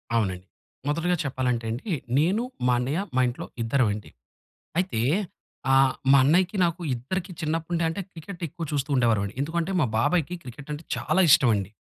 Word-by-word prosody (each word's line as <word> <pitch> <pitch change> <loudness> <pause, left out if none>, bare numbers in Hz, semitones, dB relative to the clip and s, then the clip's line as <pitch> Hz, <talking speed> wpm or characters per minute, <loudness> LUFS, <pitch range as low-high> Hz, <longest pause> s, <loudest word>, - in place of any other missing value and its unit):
అవునండి. 95 -5 0 0.4
మొదటిగా 165 +4 +1
చెప్పాలంటే 125 -3 -1
అండీ, 150 - -3 0.3
నేను 190 +10 +2 0.2
మా 125 - +4
అన్నయ్య 140 +8 -1 0.2
మా 130 - +4
ఇంట్లో 125 - -4 0.2
ఇద్దరమండి. 115 -4 0 0.7
అయితే 180 -12 -2 0.7
ఆహ్, 135 -1 +5 0.2
మా 140 - +8
అన్నయ్యకి 180 +7 +3
నాకు 170 +1 -1
ఇద్దరికి 175 +10 -4
చిన్నప్పుడు 165 +2 -1
అంటే 165 +5 -3
క్రికెట్ 170 +2 -10
ఎక్కువ 165 +3 -6
చూస్తూ 145 0 -1
ఉండేవారం. 110 -5 +2
ఎందుకంటే 165 +4 -1
మా 145 - +3
బాబాయికి 175 +6 +1
క్రికెట్ 140 +4 -10
అంటే 150 +3 -6
చాలా 190 - +1
ఇష్టం 135 -3 +6
అండి. 100 -1 -2
145 Hz, 150 wpm, -26 LUFS, 125-170 Hz, 0.7 s, మా